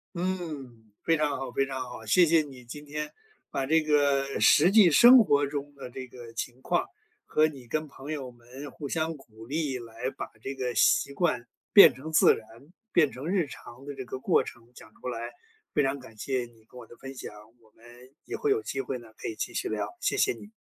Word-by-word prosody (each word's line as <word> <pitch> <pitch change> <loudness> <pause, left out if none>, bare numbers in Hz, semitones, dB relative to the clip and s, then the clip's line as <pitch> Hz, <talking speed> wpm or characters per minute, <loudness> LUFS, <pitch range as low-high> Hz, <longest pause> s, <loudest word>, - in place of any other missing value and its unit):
嗯， 150 - -5
非 165 - +2
常 150 -2 0
好 135 - -5
非 135 - +1
常 130 -1 -5
好。 125 -3 -9
谢 180 +11 +5
谢 165 0 +5
你 130 -4 -12
今 145 +5 -9
天 150 +1 -5 0.4
把 135 - -2
这 160 +3 +3
个 140 -2 +1
实 170 +6 +6
际 200 -5 +7
生 245 - +9
活 145 -11 +4
中 145 0 -5
的 130 -3 -9
这 130 +1 -7
个 120 -1 -11
情 120 +2 -5
况， 175 - 0 0.4
和 155 - +3
你 135 -5 -8
跟 155 +6 -2
朋 140 0 -10
友 135 -4 -5
们 125 +4 -11
互 145 - -7
相 160 +2 -1
鼓 110 -4 -15
励 145 -1 -2
来 115 +2 -5
把 - - -6
这 135 - -4
个 125 -2 -3
习 140 - +3
惯 140 -7 0 0.3
变 165 -9 +10
成 140 +6 -8
自 160 - +6
然、 110 - -10 0.5
变 155 -6 +4
成 135 +6 -6
日 180 -4 +1
常 130 0 -12
的 145 - -6
这 135 - -6
个 130 - -5
过 - - +3
程 120 0 -12
讲 110 - -14
出 - - -5
来。 120 0 -4 0.4
非 150 - +3
常 135 +1 -1
感 115 -3 -14
谢 125 +2 -2
你 115 -2 -22
跟 125 - -15
我 115 - -12
的 120 - -15
分 135 0 -9
享， 125 - -8 0.3
我 110 - -24
们 115 - -23 0.4
也 - - -7
会 435 - 0
有 420 +1 +2
机 135 - -4
会 130 -1 -3
呢， 120 -2 -14
可 - - -5
以 110 - -6
继 - - -4
续 - - -2
聊， 110 - -2
谢 - - 0
谢 410 -1 +3
你。 210 - -12
135 Hz, 240 characters per minute, -28 LUFS, 120-155 Hz, 0.5 s, 变